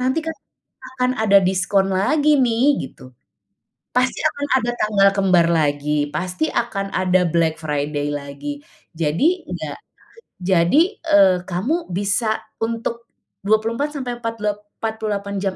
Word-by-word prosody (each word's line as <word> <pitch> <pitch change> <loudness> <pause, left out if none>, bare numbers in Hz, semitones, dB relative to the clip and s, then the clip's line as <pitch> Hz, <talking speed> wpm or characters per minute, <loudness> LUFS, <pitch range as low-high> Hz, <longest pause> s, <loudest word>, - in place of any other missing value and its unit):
nanti 260 +5 +1
kan 320 - -3 0.6
akan 250 0 +2
ada 200 -2 +5
diskon 190 +1 +1
lagi 300 +8 +3
nih 255 +3 +3
gitu, 130 - -15 0.8
pasti 250 +1 +1
akan 285 -2 0 0.2
ada 240 - 0
tanggal 200 -2 +4
kembar 185 -4 +4
lagi 150 -2 +1
pasti 185 - -2
akan 200 -4 -2
ada 185 -1 +2
Black 160 -1 +1
Friday 145 -1 -2
lagi 145 - -7 0.3
jadi 220 - +1
enggak - - -6 0.7
jadi, 195 - +3
eee, 195 - +5
kamu 245 - -2
bisa 205 +3 0 0.2
untuk, 230 +1 -3 0.3
24 225 +8 0
sampai 245 -3 -4
empat 230 -1 -4
lep 210 0 -1 0.2
empat 220 0 0
puluh 215 -1 -2
delapan 200 0 -5
jam 190 -1 -2
205 Hz, 135 wpm, -20 LUFS, 180-250 Hz, 0.8 s, ada